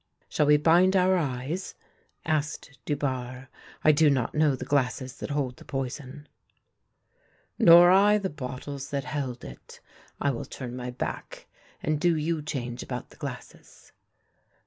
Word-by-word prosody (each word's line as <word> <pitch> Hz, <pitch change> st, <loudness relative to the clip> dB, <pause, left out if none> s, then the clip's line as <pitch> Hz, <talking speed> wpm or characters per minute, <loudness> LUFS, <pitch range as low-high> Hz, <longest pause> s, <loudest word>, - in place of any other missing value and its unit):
" -, -, -41 dB
Shall 150 Hz, -, +1 dB
we 150 Hz, 0 st, +6 dB
bind 175 Hz, +5 st, +4 dB
our 185 Hz, 0 st, +4 dB
eyes? 145 Hz, +2 st, -3 dB, 0.3 s
" -, -, -40 dB
asked 155 Hz, -2 st, -2 dB
Dubarre. 130 Hz, -3 st, -3 dB, 0.2 s
" -, -, -22 dB
I 155 Hz, -, +7 dB
do 155 Hz, 0 st, +4 dB
not 130 Hz, -4 st, 0 dB
know 150 Hz, -3 st, +3 dB
the -, -, -7 dB
glasses 130 Hz, -1 st, -1 dB
that -, -, -6 dB
hold 140 Hz, -4 st, -2 dB
the -, -, -13 dB
poison." 135 Hz, +2 st, -6 dB, 0.6 s
" -, -, -40 dB
Nor 175 Hz, +1 st, +8 dB
I 205 Hz, +2 st, +5 dB
the 195 Hz, -2 st, -3 dB
bottles 140 Hz, 0 st, -6 dB
that 140 Hz, -1 st, -2 dB
held 130 Hz, -4 st, -4 dB
it. 60 Hz, -, -12 dB, 0.4 s
I 140 Hz, -, +1 dB
will 120 Hz, -, -5 dB
turn 125 Hz, -2 st, -7 dB
my 125 Hz, 0 st, -5 dB
back, 125 Hz, -, -6 dB, 0.4 s
and 155 Hz, -1 st, 0 dB
do 175 Hz, -1 st, +3 dB
you 155 Hz, +1 st, -1 dB
change 125 Hz, -5 st, -4 dB
about 125 Hz, -2 st, -6 dB
the -, -, -17 dB
glasses." -, -, -9 dB
145 Hz, 165 wpm, -27 LUFS, 130-155 Hz, 0.6 s, Nor